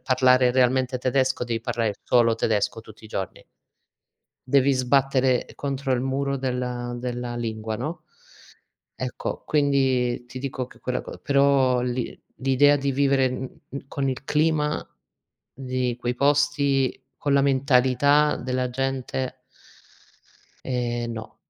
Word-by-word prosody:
parlare 125 Hz, -1 st, +4 dB
realmente 130 Hz, 0 st, +2 dB
tedesco 130 Hz, 0 st, 0 dB
devi 115 Hz, -2 st, -2 dB
parlare 115 Hz, -3 st, -1 dB
solo 115 Hz, -2 st, +3 dB
tedesco, 110 Hz, 0 st, 0 dB
tutti 110 Hz, 0 st, -16 dB
i -, -, -10 dB
giorni. 95 Hz, -3 st, -5 dB, 1.0 s
Devi 140 Hz, +1 st, +4 dB
sbattere 130 Hz, 0 st, +2 dB
contro 135 Hz, -1 st, -2 dB
il 125 Hz, -, 0 dB
muro 140 Hz, +1 st, -1 dB
della 125 Hz, -2 st, -3 dB
della 120 Hz, 0 st, -4 dB
lingua, 110 Hz, -2 st, -3 dB
no, 150 Hz, +9 st, -5 dB, 0.9 s
ecco, -, -, -5 dB
quindi 135 Hz, -4 st, +1 dB
ti 125 Hz, +1 st, -8 dB
dico 130 Hz, -1 st, -4 dB
che -, -, -18 dB
quella 125 Hz, 0 st, -2 dB
co -, -, -9 dB
però 140 Hz, -3 st, +3 dB
l'i 125 Hz, 0 st, -3 dB, 0.2 s
l'idea 135 Hz, +2 st, +4 dB
di 140 Hz, 0 st, -1 dB
vivere 135 Hz, -1 st, +3 dB
in 130 Hz, 0 st, -2 dB, 0.3 s
mhmm, 140 Hz, 0 st, -8 dB
con 140 Hz, -1 st, -2 dB
il 130 Hz, 0 st, -3 dB
clima 150 Hz, +1 st, +1 dB, 0.7 s
di 130 Hz, -2 st, -2 dB
quei 120 Hz, 0 st, -2 dB
posti, 140 Hz, -1 st, +1 dB
con 145 Hz, -, 0 dB
la 140 Hz, -, +5 dB
mentalità 140 Hz, +2 st, +3 dB
della 125 Hz, 0 st, -2 dB
gente 130 Hz, 0 st, -3 dB, 1.3 s
ehm, 120 Hz, -2 st, -2 dB
no. 110 Hz, -1 st, -8 dB
130 Hz, 130 wpm, -24 LUFS, 125-140 Hz, 1.3 s, la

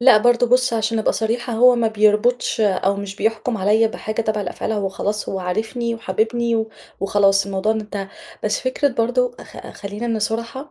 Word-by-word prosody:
لأ 245 Hz, -3 st, +7 dB
برضه 245 Hz, +1 st, +3 dB
بُصّ، 250 Hz, 0 st, +3 dB
عشان 225 Hz, 0 st, 0 dB
أبقى 215 Hz, -, +1 dB
صريحة 235 Hz, +2 st, -2 dB
هو 245 Hz, +2 st, +6 dB
ما 230 Hz, -1 st, +2 dB
بيربطش 215 Hz, +3 st, +2 dB
أو 200 Hz, -1 st, +2 dB
مش 200 Hz, 0 st, -6 dB
بيحكم 225 Hz, +2 st, -1 dB
عليَّ 215 Hz, +3 st, +3 dB
بحاجة 215 Hz, +1 st, -4 dB
تابعة 215 Hz, -1 st, -1 dB
لأفعال 195 Hz, +4 st, -4 dB
هو 205 Hz, -2 st, -1 dB
خلاص 205 Hz, +2 st, -3 dB
هو 195 Hz, -, -2 dB
عارفني 225 Hz, +6 st, -2 dB
وحاببني 230 Hz, +2 st, 0 dB
و 220 Hz, 0 st, -1 dB, 0.3 s
وخلاص 195 Hz, 0 st, +3 dB
الموضوع 200 Hz, +2 st, 0 dB
ده 220 Hz, -, -2 dB
انتهى، 200 Hz, -2 st, -6 dB, 0.4 s
بس 210 Hz, -, 0 dB
فكرة 260 Hz, +3 st, 0 dB
برضه 245 Hz, 0 st, 0 dB
أخ -, -, -11 dB
خلينا 215 Hz, +3 st, -3 dB
صُرحا، 230 Hz, +6 st, -3 dB
220 Hz, 180 wpm, -20 LUFS, 205-235 Hz, 0.4 s, لأ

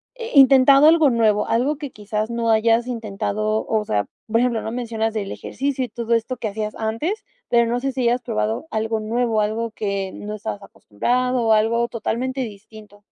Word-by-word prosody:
eh, 470 Hz, -1 st, -7 dB
intentado 275 Hz, +1 st, +7 dB
algo 320 Hz, -3 st, +6 dB
nuevo, 220 Hz, -3 st, +2 dB
algo 265 Hz, +6 st, +1 dB
que, 290 Hz, -3 st, -5 dB
quizás, 210 Hz, 0 st, -4 dB
no 235 Hz, -1 st, 0 dB
hayas 225 Hz, +1 st, +3 dB
intentado. 215 Hz, -2 st, -2 dB
O 220 Hz, -1 st, 0 dB
sea, 105 Hz, -, 0 dB, 0.2 s
por 230 Hz, +1 st, +2 dB
ejemplo, 240 Hz, -2 st, +1 dB
¿no?, 220 Hz, -, -5 dB
mencionas 225 Hz, -2 st, -2 dB
el 200 Hz, -2 st, -3 dB
ejercicio 270 Hz, -1 st, -3 dB
y -, -, -11 dB
todo 235 Hz, +1 st, -2 dB
esto 230 Hz, +2 st, -1 dB
que 220 Hz, -3 st, -3 dB
hacías 215 Hz, +1 st, -4 dB
antes, 230 Hz, -, -3 dB, 0.3 s
pero, 235 Hz, -1 st, +4 dB
no 245 Hz, -, 0 dB
sé, 270 Hz, +2 st, -2 dB
si 260 Hz, -, -2 dB
hayas 240 Hz, +1 st, +2 dB
probado 110 Hz, -, -2 dB
algo 220 Hz, -1 st, -1 dB
nuevo, 225 Hz, 0 st, 0 dB
algo 220 Hz, +2 st, -2 dB
que 200 Hz, -3 st, -3 dB
no 210 Hz, +1 st, -6 dB
estabas 205 Hz, -1 st, -5 dB
acostumbrado, 245 Hz, -, -1 dB
o 220 Hz, -, +5 dB
algo 230 Hz, +2 st, +2 dB
totalmente 250 Hz, +3 st, -3 dB
distinto. 210 Hz, -2 st, -10 dB
230 Hz, 185 wpm, -21 LUFS, 215-250 Hz, 0.3 s, intentado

